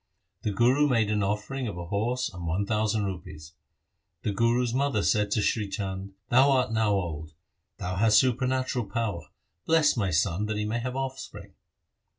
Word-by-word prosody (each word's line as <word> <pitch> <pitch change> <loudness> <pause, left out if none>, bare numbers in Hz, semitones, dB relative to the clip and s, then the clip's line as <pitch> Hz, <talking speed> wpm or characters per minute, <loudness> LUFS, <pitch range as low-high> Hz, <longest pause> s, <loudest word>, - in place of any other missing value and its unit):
The - - -1
Guru 125 +8 +3
made 115 -5 +2
an 105 -1 +1
offering 105 +6 -2
of 100 -4 -5
a 85 - -5
horse 110 +6 -1
and 90 -2 -6
one 90 +5 0
thousand 110 0 0
rupees. 85 -4 -7 0.7
The 105 - 0
Guru's 115 +3 +1
mother 130 -5 +1
said 105 -1 +2
to 105 +1 +1
Sri 105 -2 0
Chand, 95 -1 -5
' - - -51
Thou 130 +3 +6
art 130 -4 +2
now 110 -2 +2
old, 80 -5 -3 0.4
thou 90 0 -4
hast 105 +1 +5
supernatural 130 0 +1
power, 100 -9 -2 0.4
bless 160 -2 +4
my 100 -5 0
son 90 +4 +1
that 110 -1 -2
he 105 - -1
may 110 +3 -1
have 125 +2 -4
offspring.' 135 0 -6
105 Hz, 175 wpm, -27 LUFS, 100-125 Hz, 0.7 s, Thou